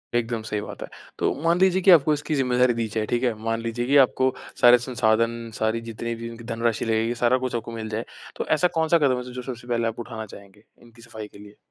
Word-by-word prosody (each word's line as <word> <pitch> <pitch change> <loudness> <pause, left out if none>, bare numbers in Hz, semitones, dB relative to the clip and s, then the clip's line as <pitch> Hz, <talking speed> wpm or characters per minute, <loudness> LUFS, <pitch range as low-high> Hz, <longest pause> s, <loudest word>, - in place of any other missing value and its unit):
एकदम 115 -1 -1
सही 105 -2 -3
बात - - -9
है। - - -7 0.3
तो - - +1
मान 170 +2 +2
लीजिए 190 0 +3
कि 190 - +6
आपको 155 -2 +6
इसकी 150 +1 -2
ज़िम्मेदारी 125 -2 +2
दी 115 -1 -2
जाए, 110 -1 0
ठीक 120 +3 -1
है? 120 -3 +2
मान 115 0 -1
लीजिए 115 +1 -3
कि 140 +1 +4
आपको 130 +1 0 0.3
सारे 120 0 +8
संसाधन, 115 0 +1
सारी 110 +1 0
जितनी 115 +1 -4
भी 115 0 -7
इनकी 115 0 -10
धनराशि 115 0 -1
लगेगी 115 +1 0
सारा 130 +2 +4
कुछ 130 -1 -3
आपको 115 0 -4
मिल 110 -1 -6
जाए। 110 +2 -3 0.3
तो - - -3
ऐसा 180 - +3
कौन-सा 160 +1 +3
कदम 130 -4 +2
है 125 - -8
जो 125 - -5
सबसे 120 -1 -8
पहले 115 -1 0
आप 115 - -4
उठाना 110 -2 -6
चाहेंगे, 100 0 -15 0.2
इनकी 115 -1 -18
सफ़ाई 110 -2 -9
के 100 - -16
लिए? 105 0 -14
115 Hz, 240 wpm, -24 LUFS, 115-125 Hz, 0.3 s, सारे